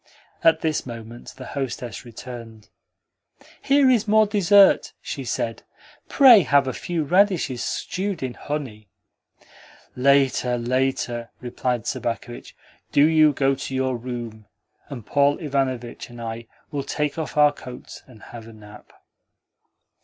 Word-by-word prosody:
At 165 -1 +4
this 155 -2 -1
moment 115 0 -10
the 130 - -9
hostess 125 -5 -5
returned. 115 -2 -10 0.9
"Here 275 0 +3
is 235 -4 +3
more 215 +1 +5
dessert," 200 -1 +4
she - - -6
said. - - -3 0.5
"Pray 260 -6 +8
have 140 -2 +3
a 130 - -2
few 170 -3 -3
radishes 175 -6 +1
stewed 190 -4 -3
in 130 -2 -3
honey." 125 -9 -6 1.1
"Later, 130 -2 +2
later," 120 -1 -1
replied 125 -1 -3
Sobakevitch. 120 +1 -5 0.4
"Do 145 - +5
you 155 -1 +5
go 135 -1 +1
to 135 0 -5
your 130 -1 0
room, 120 -3 -7 0.4
and 120 -6 -8
Paul 145 0 +2
Ivanovitch 130 -7 -3
and 120 0 -12
I 115 0 -6 0.2
will 145 -2 -2
take 150 +2 -3
off 155 - -5
our 150 0 +5
coats 125 -3 -11
and 120 -4 -16
have 115 -1 -11
a 115 - -12
nap." 105 -1 -15
130 Hz, 130 wpm, -23 LUFS, 120-155 Hz, 1.1 s, Pray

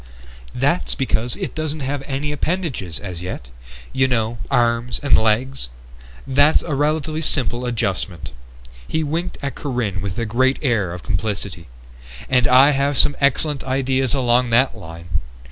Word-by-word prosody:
"That's 145 +7 +1
because 125 -3 0
it - - -4
doesn't 155 -1 -3
have 135 +1 -2
any 140 +2 -2
appendages 150 - -2
as 90 -4 -6
yet. 90 -9 -6 0.4
You 130 0 +3
know, 115 -2 -1
arms 120 -1 +1
and 140 - +5
legs. 115 - +1 0.6
That's 145 +3 +4
a 155 - -3
relatively 155 +2 0
simple 125 -5 0
adjustment." 95 -7 -2 0.6
He 160 - 0
winked 160 +4 -3
at 140 -2 -2
Corinne 120 -11 -2
with 95 -2 -4
a 115 - -1
great 130 +5 +2
air 110 - +1
of 90 0 -7
complicity. 100 -3 -3 0.6
"And 125 -1 +3
I 130 +3 +7
have 140 0 +1
some 145 - +4
excellent 140 +1 +2
ideas 130 0 +1
along 125 -1 +2
that 120 +4 +3
line. 80 0 -5
130 Hz, 145 wpm, -21 LUFS, 110-140 Hz, 0.6 s, I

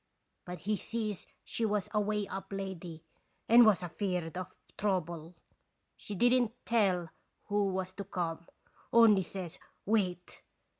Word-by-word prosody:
But 180 0 -7
he 210 +1 0
sees 215 -4 -4 0.2
she 230 - -3
was 210 -3 +1
a 210 - +3
way 210 -1 -1
up 195 0 -5
lady 180 -4 -5 0.4
and 235 0 +8
was 195 -4 +4
afeard 175 -2 -2
of 185 -1 -6 0.2
trouble. 175 -4 -2 0.6
She 205 - -7
didn't 245 +2 +3
tell 190 -7 +2 0.4
who 205 0 +2
was 185 -1 -2
to 200 +1 -6
come, 170 -3 -3 0.4
only 225 -4 +7
says 185 -2 -7 0.3
'Wait!' 185 -4 0
195 Hz, 135 wpm, -32 LUFS, 180-210 Hz, 0.6 s, and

